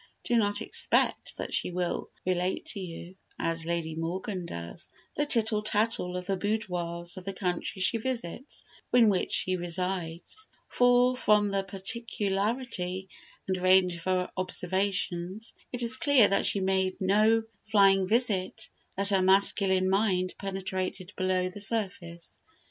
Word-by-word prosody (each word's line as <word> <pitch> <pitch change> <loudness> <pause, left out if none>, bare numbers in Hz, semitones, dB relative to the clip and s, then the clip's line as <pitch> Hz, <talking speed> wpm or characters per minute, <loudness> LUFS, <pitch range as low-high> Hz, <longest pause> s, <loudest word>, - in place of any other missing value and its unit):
Do 240 - 0
not 205 -3 +1
expect - - +1
that - - -5
she - - 0
will 180 -1 -2 0.2
relate 180 0 -1
to 205 - -3
you 180 0 -8 0.2
(as 165 0 -2
Lady 170 -2 -2
Morgan 180 +3 -4
does) 85 - -7 0.3
the 295 - 0
tittle 220 -4 +2
tattle 210 -4 0
of 180 - -6
the 195 +1 -1
boudoirs 180 -4 -3
of 185 - -7
the 195 +1 -4
countries 185 +1 -2
she 230 +5 +3
visits 245 - -4 0.3
or - - +4
in 230 -3 +6
which 190 -3 0
she 185 0 0
resides; 175 - -3 0.2
for 245 0 +4
from 210 -4 +3
the 195 0 0
particularity 195 -1 -1 0.4
and 185 -1 0
range 185 -1 +4
of 170 - -10
her 185 -1 0
observations 185 +2 -1 0.2
it 245 -1 0
is 235 +2 +7
clear 265 -6 +5
that 200 - +2
she 200 - 0
made 190 0 0
no 215 +4 +3 0.2
flying 195 -3 +4
visit, 210 -4 0 0.3
that 200 +1 +1
her 195 -2 +3
masculine 190 0 +3
mind 190 -2 +1
penetrated 190 -1 -4
below 185 -1 0
the 185 +3 -7
surface. 185 -6 -4
190 Hz, 145 wpm, -28 LUFS, 180-210 Hz, 0.4 s, is